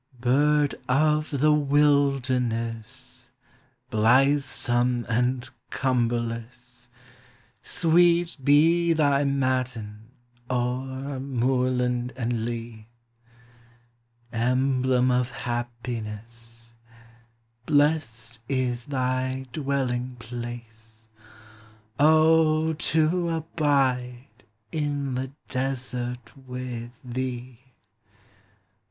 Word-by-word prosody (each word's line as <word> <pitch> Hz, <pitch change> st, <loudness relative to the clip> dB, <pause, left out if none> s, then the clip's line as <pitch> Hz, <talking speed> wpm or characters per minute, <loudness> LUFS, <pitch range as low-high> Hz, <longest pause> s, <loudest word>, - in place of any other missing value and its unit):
Bird 145 Hz, +4 st, +3 dB, 0.2 s
of 150 Hz, +3 st, +2 dB
the 150 Hz, +1 st, +2 dB
wilderness, 130 Hz, -4 st, 0 dB, 0.6 s
Blithesome 125 Hz, 0 st, +2 dB
and 125 Hz, +2 st, 0 dB, 0.2 s
cumberless, 120 Hz, 0 st, -2 dB, 0.7 s
Sweet 175 Hz, 0 st, +3 dB
be 165 Hz, +4 st, +4 dB
thy 145 Hz, -3 st, +2 dB
matin 125 Hz, -6 st, -2 dB, 0.4 s
o'er 130 Hz, +2 st, -2 dB
moorland 125 Hz, -1 st, 0 dB
and 120 Hz, -3 st, -2 dB
leal 115 Hz, -2 st, -6 dB, 1.5 s
Emblem 130 Hz, +1 st, +2 dB
of 125 Hz, 0 st, +1 dB
happiness, 115 Hz, -1 st, -6 dB, 0.9 s
Blest 145 Hz, -7 st, +1 dB
is 125 Hz, -3 st, -1 dB
thy 130 Hz, -1 st, -1 dB
dwelling 130 Hz, -4 st, -2 dB
place, 115 Hz, -2 st, -9 dB, 0.5 s
— 110 Hz, 0 st, -23 dB, 0.3 s
O, 155 Hz, +1 st, +4 dB
to 160 Hz, +3 st, +1 dB
abide 140 Hz, -7 st, -1 dB, 0.3 s
in 145 Hz, -3 st, -2 dB
the 130 Hz, +1 st, -3 dB, 0.2 s
desert 125 Hz, -2 st, -3 dB
with 125 Hz, -2 st, -7 dB
thee! 125 Hz, -1 st, -5 dB
125 Hz, 65 wpm, -25 LUFS, 120-140 Hz, 1.5 s, be